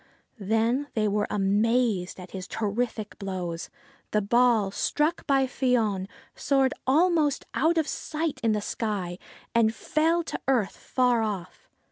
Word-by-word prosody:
Then 225 +7 +1
they 215 -1 +2
were 205 0 0
amazed 205 -1 +1
at 180 0 -10
his 185 -1 -6
terrific 215 +1 -3
blows. 180 -4 -4 0.4
The 210 - +1
ball, 230 -2 +3
struck 300 +10 0
by 270 -2 +3
Fion, 230 -7 0 0.3
soared 270 -2 +2
almost 310 0 +3
out 335 +1 +2
of 315 -2 +2
sight 315 -1 -3
in 225 -2 +2
the 210 - 0
sky, 200 -5 -3 0.3
and 225 -1 +3
fell 330 +3 +1
to - - -5
earth 245 -7 +1
far 250 -3 +1
off. 200 -5 -5
225 Hz, 135 wpm, -27 LUFS, 200-270 Hz, 0.4 s, ball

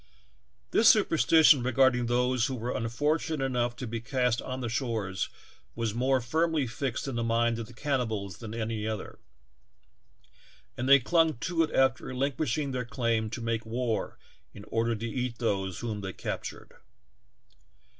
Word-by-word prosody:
This 220 - +6
superstition 160 - +5
regarding 125 -1 +3
those 125 +1 +2
who 135 - -3
were 120 +1 -3
unfortunate 145 +6 -1
enough 120 -2 0
to 125 - -6
be 115 0 -4
east 125 0 0
on 130 0 -5
their 125 - -3
shores 110 -7 -2 0.5
was 115 -2 -2
more 130 +3 +2
firmly 160 +4 0
fixed 125 +2 -3
in 135 - -3
the 120 0 -1
minds 115 0 +1
of 115 - -5
the 125 - -14
cannibals 110 - -2
than 110 -2 -7
any 110 -1 -3
other, 110 -2 -5 1.6
and 130 +2 -2
they 140 - +10
clung 160 +2 +2
to 170 -1 0
it 160 - +1
after 130 -2 +3
relinquishing 135 +1 -1
their 125 -1 -2
elaim 115 -3 -1
to 115 +2 -6
make 115 -1 -1
war 115 0 -2 0.4
in 100 - -10
order 115 0 0
to 115 +2 -4
eat 125 0 -3
those 95 -6 -1
whom 110 -3 -3
they 95 -1 -5
captured. - - -6
120 Hz, 155 wpm, -29 LUFS, 115-135 Hz, 1.6 s, they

